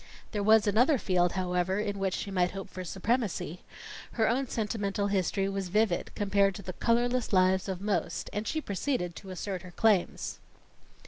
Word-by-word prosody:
There 210 Hz, -, -1 dB
was 215 Hz, +1 st, +5 dB
another 245 Hz, +8 st, +4 dB
field, 180 Hz, -5 st, +1 dB
however, 185 Hz, +1 st, 0 dB
in 205 Hz, -1 st, -2 dB
which 190 Hz, -2 st, 0 dB
she 200 Hz, -, -4 dB
might 180 Hz, -2 st, +2 dB
hope 195 Hz, +1 st, -7 dB
for 185 Hz, -, -6 dB
supremacy. 195 Hz, -, -2 dB, 0.5 s
Her 220 Hz, -2 st, +2 dB
own 260 Hz, +3 st, +1 dB
sentimental 205 Hz, -3 st, -1 dB
history 195 Hz, 0 st, +1 dB
was 195 Hz, -1 st, -2 dB
vivid, 205 Hz, -1 st, +1 dB
compared 200 Hz, -1 st, +2 dB
to 200 Hz, -, -8 dB
the 185 Hz, -, -5 dB
colorless 240 Hz, +4 st, +1 dB
lives 185 Hz, 0 st, +3 dB
of 185 Hz, -1 st, -3 dB
most, 205 Hz, 0 st, -1 dB
and 210 Hz, +2 st, -3 dB
she 315 Hz, -, -1 dB
proceeded 200 Hz, -, -2 dB
to 195 Hz, -, -10 dB
assert 185 Hz, 0 st, -4 dB
her 185 Hz, -, -10 dB
claims. 205 Hz, 0 st, +1 dB
200 Hz, 175 wpm, -29 LUFS, 185-220 Hz, 0.5 s, was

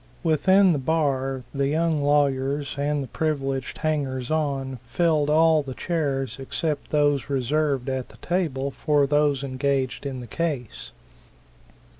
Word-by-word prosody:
Within 185 Hz, +4 st, +4 dB
the 145 Hz, -, -1 dB
bar 135 Hz, -3 st, 0 dB
the 140 Hz, -1 st, 0 dB
young 160 Hz, +1 st, +1 dB
lawyers 140 Hz, -1 st, +1 dB
and 145 Hz, 0 st, -1 dB
the -, -, -7 dB
privileged 135 Hz, -4 st, -2 dB
hangers 135 Hz, -5 st, -2 dB
on 140 Hz, -4 st, -1 dB
filled 160 Hz, -4 st, +1 dB
all 160 Hz, 0 st, +5 dB
the 135 Hz, -3 st, -7 dB
chairs 135 Hz, -7 st, -2 dB
except 145 Hz, +2 st, -3 dB
those 145 Hz, -3 st, +1 dB
reserved 140 Hz, 0 st, 0 dB
at 130 Hz, -1 st, -3 dB
the -, -, -16 dB
table 150 Hz, -7 st, -1 dB
for 145 Hz, 0 st, +2 dB
those 145 Hz, -1 st, +2 dB
engaged 135 Hz, -1 st, -1 dB
in 130 Hz, -2 st, -5 dB
the 125 Hz, -, -7 dB
case. 145 Hz, -4 st, -4 dB
140 Hz, 135 wpm, -24 LUFS, 135-155 Hz, -, all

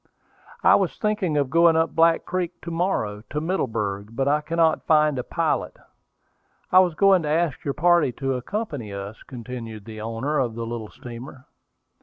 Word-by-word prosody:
"I -, -, +7 dB
was -, -, +1 dB
thinking 210 Hz, -7 st, 0 dB
of 140 Hz, -2 st, 0 dB
going 165 Hz, 0 st, +5 dB
up 160 Hz, -2 st, +1 dB
Black 165 Hz, 0 st, +3 dB
Creek 180 Hz, -1 st, -3 dB
to 170 Hz, -, -5 dB
morrow, 165 Hz, -, -1 dB
to 150 Hz, -, -2 dB
Middleburg; 115 Hz, -, -2 dB
but 135 Hz, +3 st, 0 dB
I 150 Hz, +1 st, +2 dB
cannot 165 Hz, +1 st, +1 dB
find 150 Hz, -3 st, +3 dB
a -, -, -2 dB
pilot. 165 Hz, +3 st, -1 dB, 0.9 s
I 185 Hz, -, +8 dB
was 180 Hz, -3 st, +3 dB
going 195 Hz, 0 st, +5 dB
to 150 Hz, -, -3 dB
ask 160 Hz, -2 st, 0 dB
your 140 Hz, -, -2 dB
party 170 Hz, -2 st, +3 dB
to 135 Hz, +2 st, -2 dB
accompany 135 Hz, -, -4 dB
us," 100 Hz, +2 st, -7 dB
continued 115 Hz, -4 st, -8 dB
the 110 Hz, -1 st, -8 dB
owner 115 Hz, +7 st, -2 dB
of 120 Hz, -4 st, -1 dB
the 115 Hz, 0 st, -4 dB
little 115 Hz, -2 st, -5 dB
steamer. 125 Hz, +2 st, -10 dB
150 Hz, 175 wpm, -24 LUFS, 115-165 Hz, 0.9 s, I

